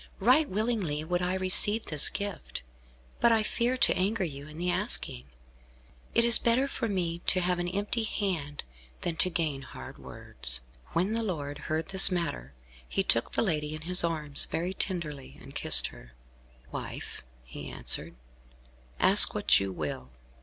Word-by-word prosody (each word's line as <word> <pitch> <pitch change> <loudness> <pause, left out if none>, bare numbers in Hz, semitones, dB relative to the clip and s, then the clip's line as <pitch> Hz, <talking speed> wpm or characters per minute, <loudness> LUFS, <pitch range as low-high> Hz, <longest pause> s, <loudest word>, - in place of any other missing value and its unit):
Right 255 +9 +4
willingly 195 -8 -1
would 175 +2 -1
I 180 +1 0
receive 190 +4 +5
this 150 -2 +5
gift, 200 - -6 0.6
but 235 - +5
I 225 -1 +3
fear 240 +3 0
to 245 - +3
anger 195 +2 0
you 145 -4 -6
in 155 0 -11
the 180 +1 0
asking. 60 - -3 0.9
It 235 - +6
is 235 -1 +7
better 240 +4 +2
for 255 -3 -3
me 175 -4 -2
to 185 - +3
have 180 0 0
an 175 - -2
empty 205 +5 -1
hand, 180 -10 -3 0.4
than 170 -2 -2
to 185 - +3
gain 155 -5 -2
hard 130 - -10
words." 60 -2 -4 0.3
When 185 +6 +1
the 230 - 0
lord 150 -9 -4
heard 155 +1 -1
this 190 0 +5
matter, 70 - -3 0.4
he - - +1
took 115 - +1
the - - +2
lady 155 -6 -1
in 155 - -8
his 180 +2 +2
arms, 155 -4 +1
very 175 +3 -2
tenderly, 155 -8 -3
and - - -13
kissed - - +1
her. - - -15 0.6
"Wife," - - -6 0.2
he 60 - -8
answered, - - -2 0.8
"ask - - +7
what - - +4
you 100 -1 -3
will. 65 -7 -5
175 Hz, 165 wpm, -29 LUFS, 150-205 Hz, 0.9 s, is